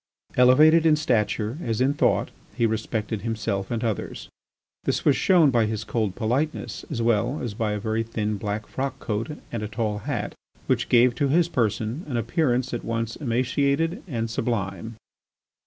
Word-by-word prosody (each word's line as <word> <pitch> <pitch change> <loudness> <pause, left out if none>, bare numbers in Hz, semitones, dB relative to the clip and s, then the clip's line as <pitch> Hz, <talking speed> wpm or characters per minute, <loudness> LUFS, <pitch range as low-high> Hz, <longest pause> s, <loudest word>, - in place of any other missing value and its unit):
Elevated 150 +6 +6
in 160 -2 +5
stature 115 -3 0
as 115 -6 -2
in 130 +2 +3
thought 145 - +1 0.2
he 115 0 +2
respected 110 -1 -2
himself 105 -3 -2
and 115 -1 -2
others. 110 -4 -3 0.5
This - - -1
was 145 - +5
shown 170 -7 +4
by 115 -3 +3
his 110 0 -3
cold 105 -3 -1
politeness 130 +7 -2
as 120 -7 -2
well 120 +5 +1
as 120 -4 -4
by 110 -1 -1
a 105 - -2
very 110 +2 -1
thin 110 -2 -2
black 105 +1 -3
frock 135 +1 -4
coat 115 +8 -3
and 115 - -3
a 105 - -3
tall 105 0 -2
hat - - -3 0.3
which - - 0
gave 120 0 +5
to 145 +3 0
his 165 +5 +3
person 115 - -1
an 130 -5 -2
appearance 125 +1 0
at 120 - -3
once 115 0 -2
emaciated 140 +6 0
and 115 -7 -2
sublime. 110 -2 -2
115 Hz, 170 wpm, -25 LUFS, 110-135 Hz, 0.5 s, Elevated